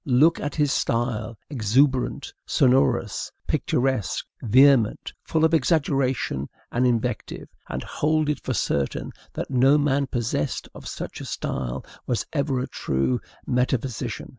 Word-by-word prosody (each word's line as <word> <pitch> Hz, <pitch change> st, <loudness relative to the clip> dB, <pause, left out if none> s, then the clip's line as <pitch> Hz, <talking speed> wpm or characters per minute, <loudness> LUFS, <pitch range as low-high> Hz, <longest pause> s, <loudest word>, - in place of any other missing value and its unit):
Look 145 Hz, +6 st, +4 dB
at 145 Hz, -1 st, -3 dB
his 150 Hz, -3 st, +2 dB
style, 115 Hz, -2 st, -1 dB
exuberant, 130 Hz, +2 st, +1 dB
sonorous, 130 Hz, -1 st, +2 dB
picturesque, 130 Hz, -6 st, 0 dB, 0.2 s
vehement, 125 Hz, -1 st, +4 dB
full 160 Hz, 0 st, +1 dB
of 160 Hz, -, +2 dB
exaggeration 135 Hz, -, +1 dB, 0.2 s
and 125 Hz, +1 st, +2 dB
invective, 120 Hz, -1 st, -2 dB, 0.2 s
and -, -, -3 dB
hold 155 Hz, 0 st, 0 dB
it 150 Hz, -, 0 dB
for 130 Hz, -, -2 dB
certain 70 Hz, -7 st, -1 dB, 0.2 s
that -, -, -4 dB
no 135 Hz, +3 st, +5 dB
man 140 Hz, -1 st, +1 dB
possessed 115 Hz, -, -2 dB
of -, -, -10 dB
such -, -, -6 dB
a -, -, -6 dB
style 65 Hz, 0 st, -3 dB, 0.2 s
was 120 Hz, -5 st, 0 dB
ever 140 Hz, -3 st, 0 dB
a -, -, -1 dB
true 65 Hz, -1 st, -1 dB, 0.3 s
metaphysician. 125 Hz, -1 st, -1 dB
130 Hz, 130 wpm, -24 LUFS, 115-140 Hz, 0.3 s, no